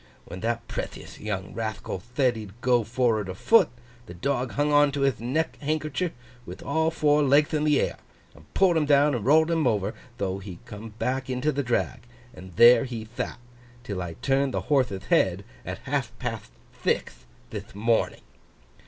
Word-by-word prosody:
When 90 Hz, -, -8 dB
that 115 Hz, +2 st, -2 dB
prethiouth -, -, -6 dB
young 100 Hz, -2 st, -4 dB
Rathcal 110 Hz, -4 st, -4 dB
thed 120 Hz, +4 st, 0 dB
he'd 105 Hz, 0 st, -9 dB
go 125 Hz, -2 st, +3 dB
for'ard 115 Hz, -3 st, 0 dB
afoot, 160 Hz, -, +4 dB, 0.4 s
the 90 Hz, -, -9 dB
dog 130 Hz, +5 st, -1 dB
hung 145 Hz, +1 st, +1 dB
on 145 Hz, 0 st, +5 dB
to 140 Hz, -, -2 dB
hith 135 Hz, -4 st, +2 dB
neck 140 Hz, +7 st, -1 dB
hankercher 155 Hz, +3 st, -1 dB, 0.3 s
with -, -, -9 dB
all 160 Hz, +3 st, +1 dB
four 150 Hz, -2 st, +3 dB
legth 145 Hz, +2 st, +4 dB
in 150 Hz, 0 st, +1 dB
the 150 Hz, -2 st, +4 dB
air -, -, -1 dB, 0.4 s
and 75 Hz, +1 st, -19 dB
pulled 180 Hz, -4 st, +4 dB
him 150 Hz, -2 st, +1 dB
down 145 Hz, 0 st, +5 dB
and 120 Hz, -5 st, -2 dB
rolled 160 Hz, +3 st, +5 dB
him 160 Hz, -4 st, +2 dB
over. 105 Hz, -1 st, 0 dB, 0.2 s
Tho 95 Hz, -1 st, -2 dB
he 95 Hz, -3 st, -8 dB
come 105 Hz, +1 st, -9 dB
back 130 Hz, +2 st, -2 dB
into 130 Hz, +4 st, 0 dB
the 140 Hz, -, -1 dB
drag, 120 Hz, -3 st, -1 dB, 0.3 s
and 90 Hz, -2 st, -12 dB
there 120 Hz, +5 st, +7 dB
he 115 Hz, -4 st, -6 dB
that, -, -, -3 dB, 0.5 s
'till 100 Hz, -3 st, -4 dB
I 85 Hz, -2 st, -5 dB
turned 135 Hz, 0 st, +1 dB
the -, -, 0 dB
horthe'th 130 Hz, -10 st, +1 dB
head, -, -, +3 dB, 0.2 s
at -, -, -5 dB
half -, -, -1 dB
patht -, -, -5 dB, 0.2 s
thixth -, -, -2 dB, 0.2 s
thith -, -, -7 dB
morning. 115 Hz, +2 st, +1 dB
125 Hz, 180 wpm, -26 LUFS, 105-145 Hz, 0.5 s, there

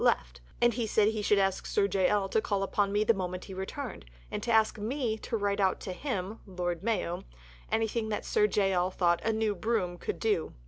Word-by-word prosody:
left. -, -, +1 dB, 0.2 s
And 240 Hz, 0 st, +4 dB
he 235 Hz, -1 st, -1 dB
said 210 Hz, 0 st, +4 dB
he 220 Hz, -1 st, -2 dB
should 205 Hz, 0 st, +3 dB
ask 195 Hz, -1 st, +1 dB
Sir 200 Hz, -1 st, +2 dB
J. 190 Hz, -1 st, +2 dB
L. 205 Hz, -2 st, +2 dB
to 220 Hz, -, +2 dB
call 200 Hz, -2 st, 0 dB
upon 200 Hz, 0 st, +1 dB
me 205 Hz, +1 st, +2 dB
the 230 Hz, -, +4 dB
moment 185 Hz, -2 st, -4 dB
he 195 Hz, -, -8 dB
returned, 195 Hz, -, -5 dB, 0.3 s
and -, -, -3 dB
to 235 Hz, -, -1 dB
ask 220 Hz, -1 st, +3 dB
me 235 Hz, +1 st, -1 dB
to 230 Hz, -, -2 dB
write 200 Hz, -1 st, 0 dB
out 190 Hz, -2 st, +2 dB
to 185 Hz, -, -4 dB
him 210 Hz, -2 st, -3 dB
(Lord 175 Hz, -3 st, -3 dB
Mayo) 200 Hz, -5 st, -1 dB, 0.5 s
anything 225 Hz, 0 st, 0 dB
that 210 Hz, -, -2 dB
Sir 210 Hz, -, +3 dB
J. 195 Hz, -2 st, +2 dB
L. 180 Hz, 0 st, +2 dB
thought 175 Hz, -2 st, +2 dB
"a 225 Hz, -, +2 dB
new 220 Hz, -1 st, +1 dB
broom" 180 Hz, -3 st, -1 dB
could -, -, -4 dB
do. 210 Hz, -7 st, 0 dB
205 Hz, 225 wpm, -30 LUFS, 185-220 Hz, 0.5 s, And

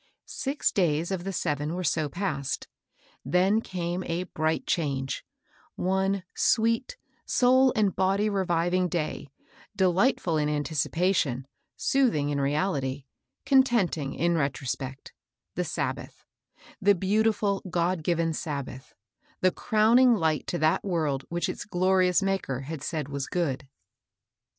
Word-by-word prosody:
Six 280 Hz, +2 st, -1 dB
days 170 Hz, -2 st, +1 dB
of 185 Hz, -2 st, -3 dB
the 195 Hz, -, -2 dB
seven 150 Hz, -3 st, -2 dB
were 185 Hz, -, -3 dB
so 155 Hz, -2 st, 0 dB
passed. 140 Hz, -6 st, -3 dB, 0.6 s
Then 185 Hz, -, +2 dB
canie 180 Hz, -2 st, -3 dB
a 170 Hz, +2 st, -1 dB
bright 160 Hz, -2 st, -1 dB
change: 135 Hz, -5 st, -1 dB, 0.5 s
one 190 Hz, +1 st, 0 dB
sweet, 230 Hz, -, +1 dB, 0.3 s
soul 260 Hz, +1 st, +4 dB
and 205 Hz, -4 st, +2 dB
body 195 Hz, +3 st, +2 dB
reviving 180 Hz, -2 st, +1 dB
day, 155 Hz, -4 st, -3 dB, 0.5 s
delightful 185 Hz, -2 st, +2 dB
in 150 Hz, 0 st, +1 dB
anticipation, 150 Hz, -2 st, 0 dB, 0.3 s
soothing 230 Hz, -, +2 dB
in 140 Hz, -1 st, 0 dB
reality, 140 Hz, -2 st, -1 dB, 0.4 s
contenting 235 Hz, -, +2 dB
in 170 Hz, +1 st, +1 dB
retrospect, 135 Hz, -2 st, -3 dB, 0.2 s
— -, -, -61 dB
the -, -, -1 dB
Sab -, -, -2 dB
bath, -, -, -12 dB, 0.3 s
— -, -, -24 dB
the 200 Hz, +1 st, +5 dB
beautiful, 205 Hz, +1 st, +1 dB
God 175 Hz, 0 st, 0 dB
given 165 Hz, -1 st, +1 dB
Sabbath, 140 Hz, -4 st, -6 dB, 0.2 s
— -, -, -37 dB
the 185 Hz, -, +4 dB
crowning 230 Hz, +5 st, +4 dB
light 160 Hz, -6 st, 0 dB
to 175 Hz, -, -2 dB
that 155 Hz, -1 st, +2 dB
world 155 Hz, -8 st, -1 dB
which 170 Hz, +1 st, -1 dB
its -, -, -4 dB
glorious 185 Hz, -1 st, +2 dB
Maker 190 Hz, -10 st, -1 dB
had 150 Hz, +1 st, -6 dB
said 155 Hz, -2 st, -3 dB
was 140 Hz, -1 st, -4 dB
good. 145 Hz, -7 st, -2 dB
175 Hz, 130 wpm, -27 LUFS, 150-195 Hz, 0.6 s, the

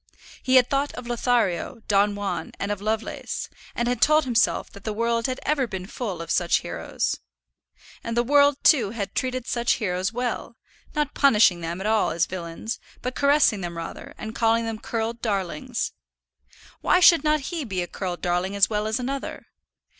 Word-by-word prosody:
He 260 Hz, -, +2 dB
had 250 Hz, -1 st, +7 dB
thought 275 Hz, +2 st, 0 dB
of 250 Hz, -, -8 dB
Lothario, 235 Hz, -2 st, 0 dB
Don 205 Hz, 0 st, +3 dB
Juan, 205 Hz, -1 st, -3 dB
and 200 Hz, -, -2 dB
of 205 Hz, -1 st, -3 dB
Lovelace; 220 Hz, +1 st, -3 dB, 0.3 s
and 240 Hz, -, 0 dB
had 245 Hz, -1 st, -1 dB
told 305 Hz, +1 st, +5 dB
himself 240 Hz, -3 st, +1 dB
that 200 Hz, -, -13 dB
the 215 Hz, -, -2 dB
world 230 Hz, +1 st, +1 dB
had 255 Hz, 0 st, -3 dB
ever 280 Hz, -4 st, +1 dB
been 190 Hz, -4 st, -5 dB
full 195 Hz, -5 st, -4 dB
of 165 Hz, -, -6 dB
such 175 Hz, -2 st, +2 dB
heroes. -, -, -3 dB, 0.8 s
And 230 Hz, 0 st, -3 dB
the 240 Hz, -, +4 dB
world, 285 Hz, +2 st, +4 dB
too, 245 Hz, -10 st, +5 dB
had 205 Hz, -2 st, -4 dB
treated 255 Hz, -1 st, -2 dB
such 235 Hz, -1 st, +1 dB
heroes 185 Hz, -2 st, -1 dB
well; 240 Hz, 0 st, -3 dB, 0.4 s
not 300 Hz, -1 st, 0 dB
punishing 210 Hz, -10 st, +4 dB
them 170 Hz, +2 st, -4 dB
at 190 Hz, -, -5 dB
all 215 Hz, 0 st, +2 dB
as 165 Hz, -, +1 dB
villains, 180 Hz, +5 st, -5 dB, 0.2 s
but 250 Hz, -, -2 dB
caressing 280 Hz, -8 st, +3 dB
them 170 Hz, -1 st, -5 dB
rather, 165 Hz, -, -7 dB
and 220 Hz, 0 st, -6 dB
calling 230 Hz, 0 st, +2 dB
them 225 Hz, -1 st, -4 dB
curled 230 Hz, +1 st, -3 dB
darlings. 220 Hz, +4 st, -2 dB, 0.9 s
Why 360 Hz, -, +4 dB
should 340 Hz, -2 st, +7 dB
not 305 Hz, -1 st, +1 dB
he 330 Hz, -3 st, -2 dB
be 190 Hz, -7 st, -2 dB
a -, -, -6 dB
curled 180 Hz, -3 st, -5 dB
darling 180 Hz, +2 st, 0 dB
as 200 Hz, 0 st, +5 dB
well 210 Hz, 0 st, 0 dB
as 220 Hz, +3 st, -1 dB
another? 270 Hz, +2 st, -4 dB
225 Hz, 185 wpm, -25 LUFS, 195-255 Hz, 0.9 s, had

